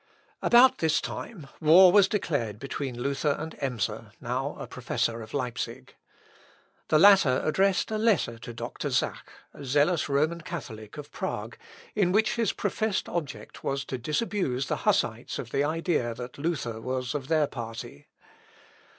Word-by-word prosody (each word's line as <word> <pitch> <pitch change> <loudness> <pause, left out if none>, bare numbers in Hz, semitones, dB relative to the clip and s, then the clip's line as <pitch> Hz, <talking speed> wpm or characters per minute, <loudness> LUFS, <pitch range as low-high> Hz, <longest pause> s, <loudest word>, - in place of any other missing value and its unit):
About 245 +2 +6
this 160 -2 +2
time 170 -12 -7
war 175 +4 +8
was 200 0 +6
declared 140 - -1
between 135 0 -5
Luther 140 +3 0
and 160 +1 -6
Emser, 125 -7 -3
now - - -3
a - - -6
professor 115 0 -2
of 110 0 -10
Leipsic. 125 -4 -4 0.9
The 155 - +4
latter 190 -8 +6
addressed 195 +6 +2
a 215 - -1
letter 200 - +1
to 120 - -8
Dr. 115 - -5
Zach, - - -1 0.2
a 145 - -10
zealous 145 +6 +2
Roman 155 +4 +1
Catholic 120 - -8
of 145 -1 -8
Prague, - - -4 0.4
in 195 -4 +2
which 215 +3 +3
his 230 -4 +1
professed 210 0 -1
object 145 -11 -5
was 135 -1 -2
to 130 - -5
disabuse 150 - -1
the - - 0
Hussites - - 0
of - - -6
the 140 - +1
idea 155 -6 0
that 125 +3 -8
Luther 125 -8 -2
was 130 +1 -3
of 140 -3 -4
their 155 -1 +3
party. 115 - -8
145 Hz, 150 wpm, -27 LUFS, 125-180 Hz, 0.9 s, war